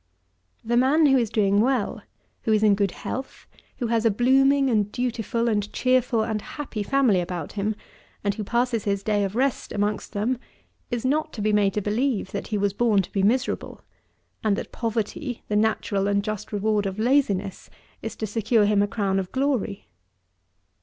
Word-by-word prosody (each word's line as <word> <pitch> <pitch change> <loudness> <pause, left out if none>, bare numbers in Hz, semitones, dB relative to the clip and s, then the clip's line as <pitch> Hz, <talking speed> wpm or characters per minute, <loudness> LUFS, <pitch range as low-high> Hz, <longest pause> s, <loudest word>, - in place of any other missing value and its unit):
17. - - -10
The 240 - +3
man, 280 +6 +4
who 270 -2 +5
is 230 -3 0
doing 200 -1 +2
well, 250 -2 0 0.4
who 220 - -1
is 215 0 +3
in 210 -1 +6
good 200 0 +1
health, 265 +8 -6 0.3
who 245 - -2
has 230 -1 +1
a 230 - +4
blooming 270 +5 +4
and 210 -4 +1
dutiful 240 -1 -1
and 210 -2 0
cheerful 255 -3 +2
and 220 -1 -2
happy 270 -6 -6
family 230 -4 +2
about 175 -3 -5
him, 210 +1 -2 0.5
and 200 0 +1
who 215 - -5
passes 235 0 0
his 200 -1 -1
day 205 -1 +1
of 195 +1 -3
rest 265 +1 0
amongst 205 0 -2
them, 225 +5 -1 0.5
is 240 0 -3
not 310 +4 +1
to 215 - -5
be 215 0 +2
made 200 -2 +2
to 210 - 0
believe, 220 0 0
that - - -4
he 215 - -1
was 200 -1 0
born 210 -3 +2
to - - -11
be 195 - +1
miserable, 245 +7 0 0.6
and 215 -2 +2
that - - -6
poverty, 230 +3 -3
the 210 - 0
natural 210 -2 +1
and 200 0 +1
just 215 -1 -5
reward 210 0 0
of 190 0 -5
laziness, 215 -6 0 0.3
is 225 0 -5
to 220 - -3
secure 220 +1 +2
him 205 0 +3
a 205 - +2
crown 195 -2 0
of 185 -1 -5
glory. 260 -7 -1
215 Hz, 190 wpm, -24 LUFS, 205-245 Hz, 0.6 s, in